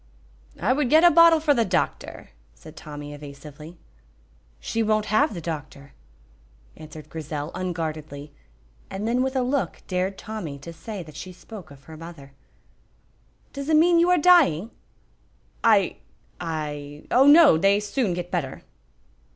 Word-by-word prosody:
"I 255 Hz, -, +2 dB
would 275 Hz, -2 st, 0 dB
get 315 Hz, +4 st, +5 dB
a 350 Hz, -, +7 dB
bottle 335 Hz, 0 st, +6 dB
frae 305 Hz, -1 st, +2 dB
the 235 Hz, -4 st, +2 dB
doctor," 175 Hz, -, -3 dB, 0.2 s
said -, -, -14 dB
Tommy, 145 Hz, -1 st, -9 dB
evasively. 145 Hz, +3 st, -11 dB, 0.8 s
"She 225 Hz, -, -3 dB
won't 215 Hz, -1 st, +1 dB
have 285 Hz, +1 st, +2 dB
the 170 Hz, -, -6 dB
doctor," 145 Hz, -3 st, -7 dB, 0.8 s
answered 155 Hz, -1 st, -11 dB
Grizel, 155 Hz, -1 st, -6 dB
unguardedly, 155 Hz, -5 st, -5 dB, 0.6 s
and 195 Hz, +3 st, -4 dB
then 245 Hz, +2 st, +1 dB
with 265 Hz, +1 st, -1 dB
a 260 Hz, -, +1 dB
look 265 Hz, +2 st, -2 dB
dared 185 Hz, +1 st, -2 dB
Tommy 195 Hz, -10 st, -6 dB
to 165 Hz, +5 st, -10 dB
say 190 Hz, +3 st, -7 dB
that 155 Hz, -2 st, -14 dB
she 185 Hz, +4 st, -8 dB
spoke 185 Hz, -1 st, -12 dB
of 140 Hz, -1 st, -16 dB
her 160 Hz, +2 st, -12 dB
mother. 155 Hz, -4 st, -12 dB, 1.2 s
"Does 280 Hz, +1 st, -6 dB
it 315 Hz, -, +4 dB
mean 335 Hz, +2 st, +5 dB
you 345 Hz, +1 st, +3 dB
are 360 Hz, -, +4 dB
dying?" 290 Hz, -, +4 dB, 0.9 s
"I 205 Hz, -6 st, +3 dB, 0.4 s
I 150 Hz, -3 st, -5 dB
oh, 265 Hz, +3 st, +5 dB
no, 290 Hz, -, +7 dB
they 195 Hz, +3 st, +3 dB
soon 210 Hz, -2 st, -1 dB
get 175 Hz, 0 st, -6 dB
better." 155 Hz, -8 st, -3 dB
180 Hz, 150 wpm, -24 LUFS, 150-250 Hz, 1.2 s, a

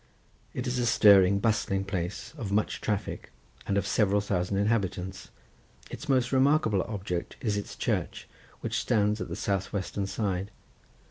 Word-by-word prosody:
It 125 Hz, -, -3 dB
is 125 Hz, -1 st, -1 dB
a 120 Hz, -, +1 dB
stirring 100 Hz, -3 st, +6 dB
bustling 100 Hz, -2 st, 0 dB
place, 90 Hz, -, -4 dB
of 115 Hz, -10 st, -5 dB
much 105 Hz, +2 st, 0 dB
traffic, 105 Hz, -2 st, -3 dB, 0.4 s
and 100 Hz, -, +1 dB
of 100 Hz, -, +1 dB
several 105 Hz, -1 st, +2 dB
thousand 95 Hz, -1 st, -1 dB
inhabitants. 95 Hz, -3 st, -1 dB, 0.6 s
Its 150 Hz, -, -8 dB
most 125 Hz, -2 st, +2 dB
remarkable 130 Hz, -7 st, +3 dB
object 95 Hz, -5 st, -4 dB
is 105 Hz, -4 st, -1 dB
its 100 Hz, -, -4 dB
church, -, -, -2 dB, 0.3 s
which -, -, -1 dB
stands 105 Hz, -1 st, +1 dB
at -, -, -3 dB
the -, -, -4 dB
south 95 Hz, -1 st, -1 dB
western 100 Hz, 0 st, -3 dB
side. 100 Hz, -2 st, -2 dB
100 Hz, 150 wpm, -28 LUFS, 95-115 Hz, 0.6 s, stirring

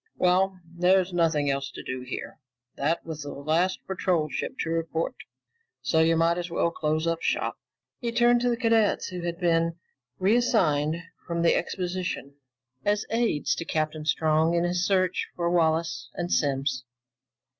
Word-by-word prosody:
Well, 185 Hz, +1 st, +2 dB
there's 180 Hz, +2 st, +2 dB
nothing 160 Hz, -5 st, +2 dB
else 135 Hz, 0 st, -2 dB
to -, -, -9 dB
do 130 Hz, 0 st, -4 dB
here. 125 Hz, +3 st, -6 dB, 0.4 s
That 155 Hz, +4 st, -1 dB
was 160 Hz, -2 st, -6 dB
the 145 Hz, -, -6 dB
last 160 Hz, +6 st, 0 dB
patrol 180 Hz, -4 st, 0 dB
ship -, -, -4 dB
to 165 Hz, -, -2 dB
report, 165 Hz, +5 st, -1 dB, 0.7 s
so 160 Hz, -, +2 dB
you 165 Hz, +1 st, +4 dB
might 170 Hz, +1 st, +2 dB
as 175 Hz, 0 st, -4 dB
well 170 Hz, 0 st, +1 dB
close 155 Hz, 0 st, -1 dB
up 165 Hz, 0 st, 0 dB
shop." -, -, -1 dB, 0.4 s
He 235 Hz, -2 st, -2 dB
turned 240 Hz, +1 st, +4 dB
to 245 Hz, -, +2 dB
the 235 Hz, -, 0 dB
cadets, 225 Hz, -3 st, +2 dB
who 180 Hz, -1 st, -5 dB
had 170 Hz, 0 st, -3 dB
been 165 Hz, -2 st, +2 dB, 0.4 s
reassigned 175 Hz, -7 st, +2 dB, 0.2 s
from 170 Hz, -1 st, -1 dB
the 170 Hz, -, +5 dB
exposition 180 Hz, -6 st, -3 dB, 0.5 s
as 205 Hz, 0 st, +1 dB
aides 225 Hz, -10 st, +1 dB
to -, -, -3 dB
Captain 155 Hz, -1 st, -2 dB
Strong 160 Hz, +1 st, +2 dB
in 170 Hz, -, +2 dB
his 175 Hz, 0 st, 0 dB
search 185 Hz, -2 st, +1 dB
for 170 Hz, -1 st, 0 dB
Wallace 160 Hz, -6 st, +1 dB
and 175 Hz, 0 st, -3 dB
Simms. 135 Hz, -2 st, 0 dB
170 Hz, 160 wpm, -26 LUFS, 155-185 Hz, 0.7 s, the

